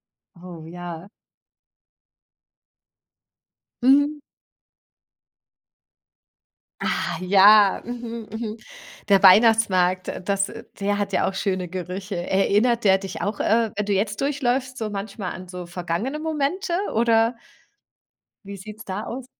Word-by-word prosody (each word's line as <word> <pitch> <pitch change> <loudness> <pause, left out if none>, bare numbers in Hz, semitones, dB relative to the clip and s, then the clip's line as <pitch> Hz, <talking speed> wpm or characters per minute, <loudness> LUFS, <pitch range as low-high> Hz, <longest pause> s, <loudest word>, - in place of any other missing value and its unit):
Ja. 180 -3 -23
Oh, 170 -3 -10
ja. 175 +1 -8 2.7
Mhm. 285 +3 +4 2.6
Ah, - - -1
ja. 200 +2 +6
Mhm, 235 -2 -6
mhm. 220 -1 -5 0.5
Der 195 -1 +5
Weihnachtsmarkt, 190 -3 +5
äh, - - -5
das 195 0 -1 0.3
der 205 +1 0
hat 200 -1 -2
ja - - +1
auch 195 - -5
schöne 185 -2 -2
Gerüche. 185 +2 -5
Erinnert 205 +6 +1
der 190 -1 +6
dich 195 -1 -7
auch, 205 0 -2
äh, 225 0 +2
wenn 210 - -1
du 205 - 0
jetzt 200 +6 -1
durchläufst, 260 -2 -1
so 220 -1 -3
manchmal 200 -1 -5
an 185 0 -9
so 180 -1 -8
vergangene 180 - -3
Momente 315 +4 -2 0.2
oder 230 +1 +3 1.1
wie 200 0 -8
sieht 210 +3 -10
es - - -11
da 195 +3 -5
aus? 255 +1 -6
205 Hz, 120 wpm, -23 LUFS, 185-235 Hz, 2.7 s, ja